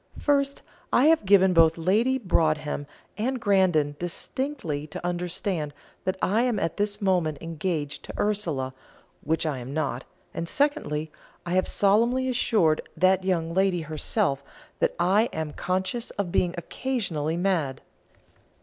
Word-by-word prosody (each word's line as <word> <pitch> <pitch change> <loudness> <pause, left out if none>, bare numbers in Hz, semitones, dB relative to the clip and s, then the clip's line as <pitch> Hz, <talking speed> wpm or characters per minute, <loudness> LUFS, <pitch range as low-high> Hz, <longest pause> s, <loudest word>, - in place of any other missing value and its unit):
First, 280 -1 +1 0.3
I 255 - +4
have 315 -7 +4
given 190 -1 +6
both 165 -1 +5
Lady 215 +10 +2
Broadhem 155 - 0 0.3
and 255 +4 -1
Grandon 180 -9 +2
distinctly 175 - -3
to 155 - -7
understand 175 -3 -2 0.3
that 185 0 0
I 215 +4 +3
am 245 -3 +1
at 165 - -2
this 205 0 -1
moment 175 -6 +1
engaged 160 -3 -3
to - - -8
Ursula, 165 -11 -1 0.5
which 160 +2 0
I 145 -4 -1
am 130 +4 -7
not; 155 - -1 0.3
and 170 0 -4
secondly, 155 - 0 0.3
I 175 - -4
have 185 0 +2
solemnly 235 +6 +2
assured 215 -10 +2 0.2
that 185 +2 +3
young 165 -3 0
lady 190 -1 +2
herself 155 -1 -1 0.4
that - - +1
I 195 +6 +3
am 160 -2 -4
conscious 190 +6 -2
of 195 -4 -3
being 175 0 +1
occasionally 170 - -2
mad." 170 -8 0
180 Hz, 140 wpm, -26 LUFS, 155-210 Hz, 0.5 s, given